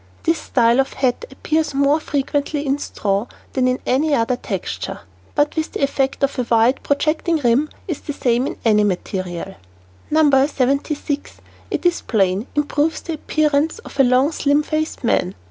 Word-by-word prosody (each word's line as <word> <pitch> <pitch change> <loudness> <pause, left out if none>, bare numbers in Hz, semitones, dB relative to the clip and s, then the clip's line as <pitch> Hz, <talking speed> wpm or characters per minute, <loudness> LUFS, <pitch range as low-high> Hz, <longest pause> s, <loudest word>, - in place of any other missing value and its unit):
This 330 0 +1
style 235 0 +2
of 270 - +1
hat 265 - 0
appears 315 -2 -1
more 280 +2 +3
frequently 290 0 -2
in 275 +1 0
straw 200 -3 -2 0.3
than 255 -1 +2
in 255 0 +1
any 290 +4 +2
other 235 +1 +1
texture, - - -5 0.3
but 290 0 +2
the 315 -1 -3
effect 275 0 0
of 275 -1 0
a 245 - -1
wide, 230 +3 +3
projecting 310 +3 +1
rim 270 +2 +2 0.2
is 335 -6 -3
the 290 - -5
same 245 -1 +1
in - - -5
any 210 -2 +4
material. 185 -1 -3 0.5
No. 290 -3 +4
76, 285 +2 -1 0.4
it - - -3
is 350 -1 +2
plain, 195 0 0
improves 295 +2 0
the 330 - -5
appearance 305 +1 +1
of 460 - -12
the 270 - +4
long, 255 +4 +3
slim 290 -1 +2
faced 310 -1 -3
man. 185 -5 +1
280 Hz, 165 wpm, -20 LUFS, 245-300 Hz, 0.5 s, any